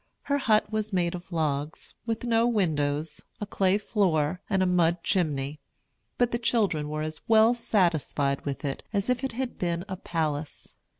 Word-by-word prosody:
Her 285 0 0
hut 215 -4 +2
was 215 0 -2
made 175 -3 +1
of 180 +1 -8
logs, 150 -2 -2
with 225 0 -2
no 230 -1 +3
windows, 155 -8 0 0.2
a 210 - -3
clay 195 -1 +2
floor, 180 -6 +1
and 190 -2 +2
a - - +3
mud 175 -1 +2
chimney. 150 -5 0 0.6
But 245 -1 +2
the 235 - -1
children 200 -11 +1
were 155 0 -2
as 155 0 -5
well 225 +1 +6
satisfied 170 - +1
with 140 0 -4
it 135 - -3
as 200 +3 0
if 250 +1 -1
it 265 - -2
had 255 +1 -4
been 170 0 -1
a 190 -2 -5
palace. 155 -4 -3
180 Hz, 175 wpm, -27 LUFS, 155-220 Hz, 0.6 s, well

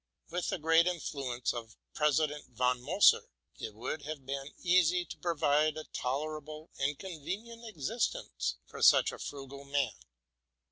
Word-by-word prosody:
With 175 +1 -1
the - - 0
great 165 +1 +4
influ 140 -7 -2
ence 125 - 0
of 115 -2 -7 0.2
President 150 0 +1
von 125 +1 +1
Moser, 175 +10 +5 0.3
it 110 - -6
would 120 +7 -4
have 145 -2 -6
been 135 +1 -4
easy 180 -1 +4
to - - -9
provide 155 -2 +2
a 155 - -4
tolerable 155 +4 -3
and 140 +1 0
convenient 200 +7 -6
existence 170 - -2
for - - -10
such - - +7
a - - -9
frugal 140 0 -7
man. 140 -1 +1
150 Hz, 145 wpm, -32 LUFS, 135-170 Hz, 0.3 s, such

